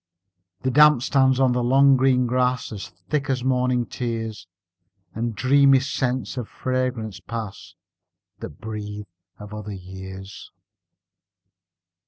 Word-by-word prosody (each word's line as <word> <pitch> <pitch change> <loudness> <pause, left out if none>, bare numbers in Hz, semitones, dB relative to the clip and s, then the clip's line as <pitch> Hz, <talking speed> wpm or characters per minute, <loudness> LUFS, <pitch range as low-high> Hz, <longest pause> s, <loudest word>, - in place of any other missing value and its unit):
The 130 - +1
damp 150 -2 +6
stands 130 -2 +3
on 130 -2 +4
the 125 0 0
long 135 +2 +5
green 130 -1 +3
grass 125 0 0
As 100 -3 -6 0.2
thick 145 -1 0
as 130 -2 0
morning's 125 -1 +1
tears, 115 -5 -4 0.7
And 115 0 -3
dreamy 135 +4 +5
scents 130 -3 -2
of 120 -3 -4
fragrance 125 -6 -2
pass 110 +1 -7 0.6
That 75 - -9
breathe 105 -1 -6 0.3
of 105 0 -10
other 105 -1 -6
years. 95 +1 -10
125 Hz, 120 wpm, -23 LUFS, 105-130 Hz, 0.7 s, damp